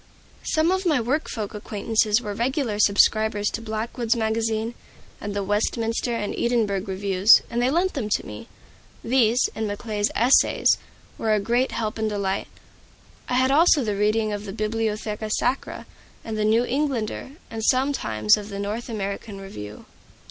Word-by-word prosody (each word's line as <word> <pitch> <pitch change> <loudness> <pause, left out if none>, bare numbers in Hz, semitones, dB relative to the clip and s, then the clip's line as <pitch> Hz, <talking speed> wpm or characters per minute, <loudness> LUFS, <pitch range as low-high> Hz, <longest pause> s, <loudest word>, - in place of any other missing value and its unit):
Some 320 +2 +2
of 375 0 0
my 300 -6 +3
work 265 +7 -1
folk 215 -3 -4
acquaintances 210 +1 0
were 205 - -4
regular 235 -1 -1
subscribers 210 0 +3
to 230 - -4
"Blackwood's 225 +2 -2
Magazine" 220 0 -1 0.5
and 205 0 -5
the 200 - -1
"Westminster" 225 +3 -1
and 205 -3 -3
"Edinburgh" 215 -5 0
reviews, 195 +1 +4
and 235 +1 0
they 245 - +2
lent 350 +6 +1
them 230 -7 -3
to - - 0
me. 105 0 -9 0.6
These, 240 0 +3
and 220 -1 -3
Macaulay's 205 0 -2
"Essays," 245 +5 +4 0.4
were 220 -1 +2
a - - +1
great 240 +5 +1
help 220 -1 -3
and 220 0 0
delight. 200 -2 -2 0.8
I 250 - 0
had 260 +1 +3
also 305 -1 +5
the 210 -3 -1
reading 215 +1 +1
of 205 0 -5
the 195 - -6
"Bibliotheca 215 0 -2
Sacra" 250 +4 -1 0.4
and 225 - -4
the 215 0 0
"New 225 +3 +3
Englander;" 265 -2 -2 0.2
and 225 -1 -5
sometimes 215 - +2
of 210 0 -7
the 200 - -6
"North 210 +5 -4
American 200 -1 -5
Review." 105 - -9
220 Hz, 160 wpm, -24 LUFS, 205-240 Hz, 0.8 s, also